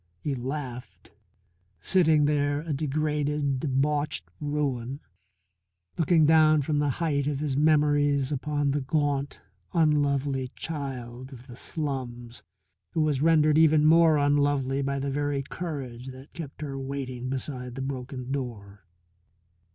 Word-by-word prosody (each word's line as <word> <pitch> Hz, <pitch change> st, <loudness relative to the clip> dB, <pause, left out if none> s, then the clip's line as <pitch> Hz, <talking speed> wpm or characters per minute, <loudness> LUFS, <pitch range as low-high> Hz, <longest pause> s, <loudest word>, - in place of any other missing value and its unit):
He 145 Hz, -, -2 dB
laughed, 125 Hz, -, -6 dB, 0.7 s
sitting 160 Hz, -, +3 dB
there 145 Hz, 0 st, +1 dB
a 160 Hz, -1 st, -3 dB
degraded, 150 Hz, -1 st, -1 dB
debauched 145 Hz, +2 st, 0 dB
ruin, 140 Hz, -3 st, -2 dB, 1.0 s
looking 165 Hz, -1 st, +4 dB
down 155 Hz, -1 st, +5 dB
from 150 Hz, +1 st, 0 dB
the 145 Hz, -1 st, +1 dB
height 145 Hz, -4 st, 0 dB
of 145 Hz, -2 st, -1 dB
his 145 Hz, -3 st, -1 dB
memories 145 Hz, -2 st, +3 dB
upon 145 Hz, 0 st, 0 dB
the 145 Hz, +1 st, 0 dB
gaunt, 145 Hz, 0 st, -1 dB, 0.3 s
unlovely 145 Hz, -4 st, +1 dB
child 130 Hz, -4 st, -6 dB
of 125 Hz, -2 st, -12 dB
the 120 Hz, -, -11 dB
slums 125 Hz, -5 st, -5 dB, 0.5 s
who 160 Hz, -, +1 dB
was 150 Hz, -3 st, +1 dB
rendered 155 Hz, -1 st, +4 dB
even 155 Hz, -1 st, +5 dB
more 160 Hz, 0 st, +6 dB
unlovely 145 Hz, -2 st, +2 dB
by 140 Hz, 0 st, -1 dB
the 140 Hz, 0 st, -2 dB
very 145 Hz, 0 st, -1 dB
courage 135 Hz, -6 st, -6 dB
that 130 Hz, +2 st, -11 dB
kept 155 Hz, -5 st, -8 dB
her 135 Hz, -2 st, -4 dB
waiting 130 Hz, -2 st, -4 dB
beside 130 Hz, -2 st, -5 dB
the 135 Hz, -, -5 dB
broken 130 Hz, -1 st, -5 dB
door. 105 Hz, -8 st, -6 dB
145 Hz, 130 wpm, -27 LUFS, 130-150 Hz, 1.0 s, more